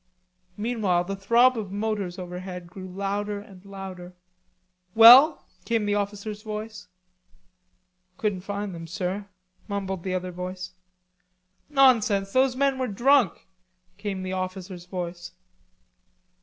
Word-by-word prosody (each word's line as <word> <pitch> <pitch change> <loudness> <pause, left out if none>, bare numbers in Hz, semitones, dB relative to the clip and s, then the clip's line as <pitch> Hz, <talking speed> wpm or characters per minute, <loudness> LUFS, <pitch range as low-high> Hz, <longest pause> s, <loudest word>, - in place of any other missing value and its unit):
Meanwhile 210 -6 0
the 195 +2 -4
throb 235 +6 +4
of 200 -3 -6
motors 205 -3 -3
overhead 180 0 -7
grew 185 +2 -10
louder 200 +2 -3
and 195 -2 -14
louder. 190 -2 -9 0.8
"Well?" 250 +7 +9 0.2
came 230 -3 0
the 205 - 0
officer's 205 +1 -3
voice. 215 -1 -7 1.3
"Couldn't 205 -4 -1
find 200 0 -4
them, 165 -1 -8
sir," 190 +3 -4 0.4
mumbled 195 -3 -3
the 185 +1 -3
other 185 0 -3
voice. 180 +1 -6 1.0
"Nonsense. 220 -8 +3
Those 260 0 +3
men 270 0 +1
were 255 - 0
drunk," 240 0 +2 0.5
came 200 -3 -4
the 185 0 -4
officer's 185 -1 -5
voice. 180 -1 -6
200 Hz, 115 wpm, -25 LUFS, 185-215 Hz, 1.3 s, Well